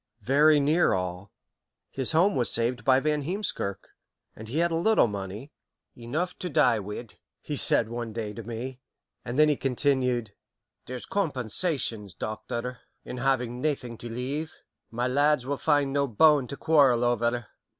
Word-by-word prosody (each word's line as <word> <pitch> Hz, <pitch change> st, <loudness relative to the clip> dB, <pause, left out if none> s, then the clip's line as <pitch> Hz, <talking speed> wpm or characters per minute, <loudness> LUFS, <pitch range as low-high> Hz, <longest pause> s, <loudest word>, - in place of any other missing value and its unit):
"Very 150 Hz, +3 st, +4 dB
near 155 Hz, +5 st, +2 dB
all. 90 Hz, +1 st, -5 dB, 0.6 s
His 130 Hz, -2 st, 0 dB
home 180 Hz, +5 st, +3 dB
was 120 Hz, -2 st, +1 dB
saved 115 Hz, 0 st, +1 dB
by 130 Hz, +2 st, +4 dB
Van 150 Hz, +1 st, 0 dB
Heemskirk, 165 Hz, -, -2 dB, 0.5 s
and 110 Hz, -, -10 dB
he 125 Hz, +7 st, -4 dB
had 170 Hz, +1 st, +2 dB
a -, -, 0 dB
little 215 Hz, -, +3 dB
money 105 Hz, +5 st, -6 dB, 0.4 s
'enough 150 Hz, +10 st, -3 dB
to 180 Hz, -, -4 dB
die 140 Hz, -8 st, +3 dB
wi'' 105 Hz, +3 st, -7 dB, 0.3 s
he -, -, -5 dB
said 115 Hz, -, +6 dB
one 120 Hz, 0 st, -5 dB
day 110 Hz, -1 st, -5 dB
to 115 Hz, -, -7 dB
me; 120 Hz, +3 st, -7 dB, 0.4 s
and 120 Hz, +2 st, -5 dB
then 155 Hz, 0 st, +6 dB
he 150 Hz, -, +2 dB
continued, 125 Hz, -4 st, 0 dB, 0.5 s
'there's 125 Hz, -1 st, -6 dB
compensations, 125 Hz, -, -2 dB
Doctor, 120 Hz, +3 st, -5 dB, 0.3 s
in 125 Hz, -, -7 dB
having 125 Hz, -2 st, -1 dB
naething 135 Hz, -6 st, -2 dB
to 120 Hz, -, -7 dB
leave. 135 Hz, +7 st, -4 dB, 0.4 s
My 120 Hz, +2 st, -2 dB
lads 145 Hz, 0 st, +2 dB
will 140 Hz, +1 st, -2 dB
find 145 Hz, -2 st, +1 dB
no 140 Hz, 0 st, +1 dB
bone 140 Hz, +3 st, +4 dB
to 140 Hz, -, -7 dB
quarrel 140 Hz, -7 st, +3 dB
over.' 120 Hz, 0 st, 0 dB
125 Hz, 160 wpm, -26 LUFS, 115-150 Hz, 0.6 s, said